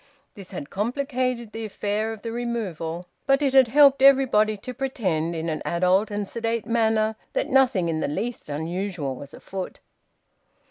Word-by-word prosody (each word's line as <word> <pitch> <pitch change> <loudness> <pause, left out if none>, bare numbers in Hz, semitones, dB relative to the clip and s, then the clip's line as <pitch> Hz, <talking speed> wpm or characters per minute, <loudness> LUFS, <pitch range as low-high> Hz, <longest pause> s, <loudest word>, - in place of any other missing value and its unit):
This 195 -3 -10
had 165 -7 -7
complicated 250 +1 -2
the 225 +1 -6
affair 210 +1 -2
of 220 -2 -9
the 230 - -4
removal; 190 -8 -3 0.2
but 275 +1 +3
it 270 -2 +1
had 265 -2 +7
helped 275 +2 +6
everybody 255 -6 +5
to 250 +5 -7
pretend, 185 - -1
in 165 0 -3
an 155 -2 -2
adult 185 +5 +2
and 205 -1 -3
sedate 230 0 -2
manner, 220 -2 +1 0.2
that - - -1
nothing 255 -10 +3
in 160 -1 -1
the - - -1
least 225 +7 -4
unusual 160 -1 -3
was 140 +2 -10
afoot. 190 -1 -7
215 Hz, 165 wpm, -24 LUFS, 180-245 Hz, 0.2 s, had